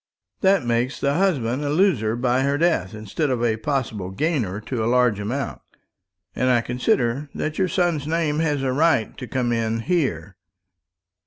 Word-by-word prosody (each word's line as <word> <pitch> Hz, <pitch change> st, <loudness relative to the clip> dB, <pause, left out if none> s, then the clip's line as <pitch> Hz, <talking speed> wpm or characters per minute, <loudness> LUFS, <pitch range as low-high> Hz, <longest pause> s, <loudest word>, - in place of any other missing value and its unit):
That 190 Hz, -7 st, +3 dB
makes 120 Hz, +3 st, 0 dB
the 140 Hz, 0 st, +1 dB
husband 145 Hz, -8 st, +1 dB
a 145 Hz, -, -1 dB
loser 145 Hz, -, +2 dB
by 125 Hz, +1 st, +1 dB
her 140 Hz, +1 st, +1 dB
death, 145 Hz, -, +1 dB
instead 110 Hz, +8 st, -2 dB
of 125 Hz, -2 st, -1 dB
a 110 Hz, -2 st, +1 dB
possible 115 Hz, -7 st, -2 dB
gainer 115 Hz, -, -1 dB
to 115 Hz, +1 st, -3 dB
a 115 Hz, -, +1 dB
large 125 Hz, -4 st, +3 dB
amount. 120 Hz, +6 st, -3 dB, 0.7 s
And 130 Hz, -, +1 dB
I 120 Hz, -2 st, +4 dB
consider 125 Hz, +3 st, 0 dB
that 155 Hz, +3 st, -3 dB
your 190 Hz, -, +3 dB
son's 170 Hz, -4 st, 0 dB
name 155 Hz, -2 st, 0 dB
has 150 Hz, -4 st, 0 dB
a 130 Hz, -1 st, 0 dB
right 145 Hz, -6 st, +2 dB
to 125 Hz, -, -6 dB
come 125 Hz, 0 st, -1 dB
in 115 Hz, -1 st, 0 dB
here." 140 Hz, -, -1 dB
130 Hz, 170 wpm, -23 LUFS, 115-150 Hz, 0.7 s, I